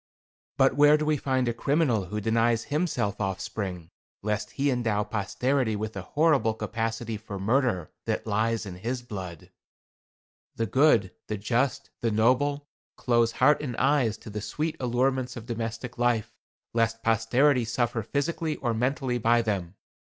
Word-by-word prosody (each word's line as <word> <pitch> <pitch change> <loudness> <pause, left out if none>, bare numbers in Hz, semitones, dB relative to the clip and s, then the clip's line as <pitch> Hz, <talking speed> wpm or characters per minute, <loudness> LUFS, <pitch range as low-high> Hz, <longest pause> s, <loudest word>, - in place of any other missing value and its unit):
But 135 -1 +4
where 145 +1 +6
do 150 - -2
we 155 0 +2
find 130 -3 0
a 120 - +1
criminal 125 - +1
who 105 +4 -4
denies 115 +1 +2
himself 150 - 0
offspring, 95 -3 -4 0.3
lest 105 0 -1
he 140 0 +1
endow 115 -4 0
posterity 110 +4 0
with 110 +1 -4
the 95 - -5
horrible 140 - +2
capacity 115 +1 -3
for 105 -1 -7
murder 105 - +1
that - - -2
lies 110 +1 0
in 90 -3 -7
his 120 +6 -3
blood? 90 -6 -8 1.0
The 115 - 0
good, 120 -5 +3 0.2
the 105 - -2
just, 125 +6 -1
the 115 - 0
noble, 130 +6 +2 0.3
close 120 -2 +2
heart 150 +4 +4
and 125 -6 -4
eyes 130 -6 +2
to 110 - -11
the 105 0 -4
sweet 155 +8 -3
allurements 130 +1 0
of 115 - -8
domestic 115 +1 -5
life, 120 -3 +1 0.4
lest 115 0 0
posterity 120 +4 +3
suffer 120 +1 -1
physically 150 +7 -2
or 120 -3 -1
mentally 125 +1 0
by 115 +1 +3
them. 100 -4 -2
115 Hz, 150 wpm, -27 LUFS, 110-130 Hz, 1.0 s, where